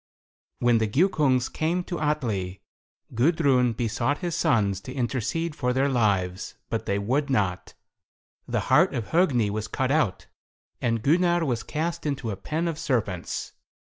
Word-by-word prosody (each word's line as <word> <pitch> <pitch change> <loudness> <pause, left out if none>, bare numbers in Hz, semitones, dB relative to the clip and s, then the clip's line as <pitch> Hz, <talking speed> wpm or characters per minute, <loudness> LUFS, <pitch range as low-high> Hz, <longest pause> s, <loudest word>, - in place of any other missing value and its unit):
When 120 -1 +3
the 110 - +1
Giukungs 135 - +2
came 170 +3 -1
to 175 -1 -5
Atli, 115 -12 -2 0.5
Gudrun 130 -2 +3
besought 120 +5 -1
his 175 -3 -3
sons 105 - +1
to 130 - -8
intercede 135 +6 -2
for 125 -3 0
their 135 +2 +2
lives, 100 -7 0 0.2
but 115 -1 -2
they 100 - +1
would 130 +9 0
not. 100 -8 -1 0.7
The - - 0
heart - - +3
of 115 - -3
Hogni 135 - +2
was 110 +1 -3
cut 130 +3 -1
out, 135 -11 +1 0.6
and 115 -2 0
Gunnar 175 +3 +3
was 120 -5 -1
cast 165 +1 -3
into 135 -6 -2
a - - -3
pen 155 - -2
of 160 -2 -3
serpents. 100 -9 -2
125 Hz, 150 wpm, -26 LUFS, 110-155 Hz, 0.7 s, When